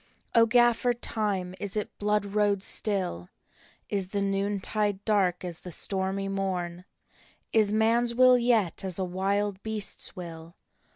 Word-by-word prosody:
" - - -38
O 230 0 +5
Gaffer 240 +1 +3
Time, 205 -6 -2
is 200 +1 -3
it 210 - -4
blood 210 0 +1
road 200 -1 +1
still? 185 - -1 0.6
Is 195 -2 -1
the 200 +1 -2
noontide 200 +1 -1
dark 190 -4 +1
as 175 -2 -6
the 180 - -9
stormy 195 +2 0
morn? 180 -3 -3 0.7
Is 215 -2 +4
man 225 +3 +3
s 235 0 -2
will 255 0 +7
yet 235 -8 +1
as 185 -3 -3
a 190 - -1
wild 195 +2 -1
beast 215 -2 -2
s - - -1
will? 165 -1 -9
200 Hz, 155 wpm, -27 LUFS, 185-215 Hz, 0.7 s, will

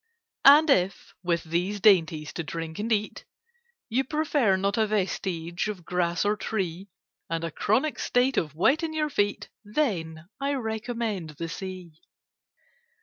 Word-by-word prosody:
And 295 +3 +9
if, 185 -5 +1
with 170 -2 0
these 180 +5 -1
dainties 165 -7 +3
to 170 - -3
drink 160 +2 -6
and 225 +3 -2
eat, 210 -1 -1 0.6
You 255 +2 +1
prefer 285 -7 +1
not 200 +2 0
a 220 -1 +2
vestige 180 -4 -2
of 195 -5 -6
grass 175 0 0
or 205 +1 +2
tree, 195 -3 -3 0.4
And 165 0 -2
a 165 - -3
chronic 250 - 0
state 250 +2 +2
of 155 -7 -1
wet 270 - +3
in 320 -1 -3
your 305 -1 0
feet, 205 -6 0
Then—I 205 - -2
recommend 220 - -3
the 170 - -4
Sea. 185 -1 -7
200 Hz, 145 wpm, -27 LUFS, 170-235 Hz, 0.6 s, And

